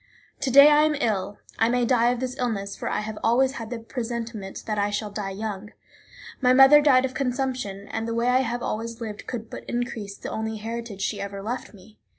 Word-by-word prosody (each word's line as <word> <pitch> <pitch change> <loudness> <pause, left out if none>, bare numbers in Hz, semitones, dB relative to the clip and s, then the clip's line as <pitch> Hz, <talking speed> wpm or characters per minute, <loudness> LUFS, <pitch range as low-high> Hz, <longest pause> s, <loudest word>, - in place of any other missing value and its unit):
To 270 - -1
day 280 +3 +9
I 295 0 +6
am 305 -1 +1
ill; 205 -6 -1 0.2
I 225 - +4
may 245 0 +2
die 240 -1 +3
of 245 -1 -1
this 255 -1 -3
illness, 200 -5 -2
for - - -4
I - - -1
have 215 0 -6
always 255 +3 +3
had 225 -2 -6
the 240 - -4
presentiment 230 -4 -5
that 215 -1 -2
I 205 0 +1
shall 205 0 -3
die 205 -1 -4
young. 210 +1 -5 0.7
My 250 -1 +5
mother 270 +3 +8
died 265 -3 +5
of 260 - -4
consumption, 250 -7 -2
and 225 +1 -3
the 230 - -2
way 235 +1 +1
I 250 +1 +4
have 240 -1 -2
always 230 +1 -4
lived 215 -3 -7
could 230 -2 -5
but - - -8
increase 225 -4 -4
the - - -7
only 220 0 -3
heritage 225 -2 -5
she 205 -1 -2
ever 200 0 -6
left 230 0 -5
me. 205 +3 -18
230 Hz, 220 wpm, -25 LUFS, 210-250 Hz, 0.7 s, day